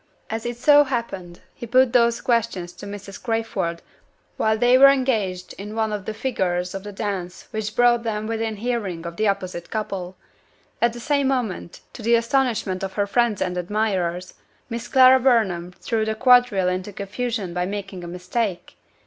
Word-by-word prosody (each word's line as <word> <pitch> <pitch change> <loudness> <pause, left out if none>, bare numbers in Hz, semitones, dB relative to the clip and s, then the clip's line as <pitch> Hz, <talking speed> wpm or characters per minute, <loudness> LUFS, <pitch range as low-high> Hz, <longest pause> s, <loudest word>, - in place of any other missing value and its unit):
As 225 +1 -3
it 240 0 -4
so 290 +3 +6
happened, 195 -9 -4
he 235 - -8
put 255 +1 +4
those 235 -1 +3
questions 225 -7 0
to 205 - -10
Mrs. 200 -1 -8
Crayford 220 -7 -2 0.5
while 220 0 +1
they 245 +3 +4
were 275 +2 +9
engaged 220 -10 0
in 210 +2 -7
one 220 -1 0
of 205 -2 -4
the 220 - -3
figures 180 -7 -1
of 195 - -5
the 205 - -7
dance 195 -3 -5
which 215 -1 -4
brought 240 -1 +4
them 215 -2 -3
within 225 0 -2
hearing 205 -7 -3
of 170 0 -6
the 215 - +1
opposite 185 -3 -2
couple. 190 -4 -4 0.6
At 235 0 +3
the 240 - -8
same 280 +1 +1
moment 240 -10 -2
to - - -9
the 235 +2 +3
astonishment 230 -5 0
of 190 -1 -4
her 205 0 0
friends 230 0 +1
and 180 -1 -2
admirers 185 -2 -1 0.4
Miss 235 +1 -4
Clara 260 0 +7
Burnham 210 -9 +2
threw 225 +3 -2
the 220 0 -1
quadrille 245 -6 +4
into 185 +2 -2
confusion 200 -1 -4
by 180 0 -1
making 195 -2 -6
a - - -6
mistake! 180 +2 -3
215 Hz, 175 wpm, -23 LUFS, 185-235 Hz, 0.6 s, were